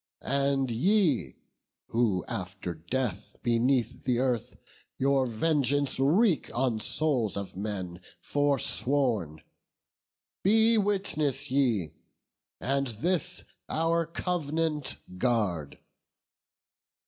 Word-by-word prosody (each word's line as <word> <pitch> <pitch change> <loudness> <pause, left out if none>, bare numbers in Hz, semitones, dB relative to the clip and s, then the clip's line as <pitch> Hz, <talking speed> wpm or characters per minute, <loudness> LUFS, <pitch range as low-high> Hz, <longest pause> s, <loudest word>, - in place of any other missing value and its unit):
And 140 -1 +1
ye, 175 - +2 0.5
who 110 -6 +1
after 90 -1 -5
death 100 +5 -3
beneath 120 +1 +1
the 125 -2 +1
earth 125 -2 -1 0.4
Your 135 -1 +2
vengeance 140 +2 +1
wreak 165 - +3
on 120 -3 +1
souls 125 -4 0
of 100 -2 -5
men 95 -3 -4 0.2
forsworn, 130 - 0 1.0
Be 225 +3 +5
witness 155 -10 0
ye, 120 - +1 0.7
and 140 +1 0
this 170 - -1 0.3
our 165 +1 +1
cov'nant 160 -3 -1 0.2
guard. 100 - 0
130 Hz, 85 wpm, -28 LUFS, 110-155 Hz, 1.0 s, Be